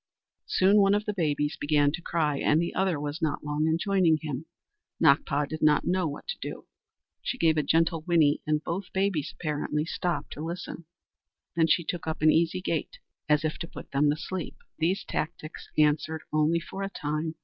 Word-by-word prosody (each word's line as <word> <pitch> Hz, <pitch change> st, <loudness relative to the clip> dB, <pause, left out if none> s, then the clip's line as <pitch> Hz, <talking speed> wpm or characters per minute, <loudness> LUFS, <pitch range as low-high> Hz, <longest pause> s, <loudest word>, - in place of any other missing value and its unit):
Soon 195 Hz, +3 st, +4 dB
one 195 Hz, 0 st, +4 dB
of 210 Hz, 0 st, -1 dB
the 210 Hz, -, -1 dB
babies 150 Hz, -4 st, 0 dB
began 145 Hz, -1 st, +3 dB
to 175 Hz, -, -5 dB
cry, 155 Hz, -4 st, 0 dB
and 150 Hz, -, +3 dB
the 170 Hz, -, -1 dB
other 185 Hz, -5 st, +1 dB
was 145 Hz, +1 st, -4 dB
not 155 Hz, -2 st, -1 dB
long 150 Hz, +1 st, 0 dB
in 160 Hz, 0 st, +2 dB
joining 185 Hz, -4 st, +3 dB
him. 150 Hz, 0 st, -5 dB, 0.5 s
Nakpa 140 Hz, +1 st, +3 dB
did 155 Hz, +2 st, -6 dB
not 150 Hz, -1 st, +4 dB
know 180 Hz, -2 st, +1 dB
what 145 Hz, -, -6 dB
to 485 Hz, -, -3 dB
do. -, -, -6 dB, 0.6 s
She 255 Hz, -, -3 dB
gave 160 Hz, -7 st, +3 dB
a 155 Hz, -, +2 dB
gentle 165 Hz, +2 st, +2 dB
whinny 155 Hz, -3 st, +3 dB
and 155 Hz, 0 st, +1 dB
both 185 Hz, +2 st, -4 dB
babies 190 Hz, -6 st, 0 dB
apparently 150 Hz, -1 st, -1 dB
stopped 175 Hz, +1 st, -2 dB
to -, -, -8 dB
listen; 170 Hz, 0 st, -6 dB, 0.7 s
then 165 Hz, -1 st, +3 dB
she 170 Hz, +2 st, +3 dB
took 170 Hz, 0 st, -4 dB
up 160 Hz, -1 st, -3 dB
an 155 Hz, -, +7 dB
easy 170 Hz, +2 st, +2 dB
gait 165 Hz, -4 st, -2 dB, 0.3 s
as 150 Hz, 0 st, +4 dB
if 155 Hz, -, -2 dB
to 170 Hz, -, -4 dB
put -, -, -11 dB
them 145 Hz, +1 st, +3 dB
to 145 Hz, -, +2 dB
sleep. 170 Hz, +3 st, -5 dB, 0.2 s
These 175 Hz, +5 st, +1 dB
tactics 155 Hz, 0 st, -5 dB
answered 155 Hz, +1 st, +2 dB
only 155 Hz, +2 st, +3 dB
for 190 Hz, +3 st, -7 dB
a 195 Hz, -, -2 dB
time. 155 Hz, -2 st, -3 dB
160 Hz, 195 wpm, -28 LUFS, 150-175 Hz, 0.7 s, an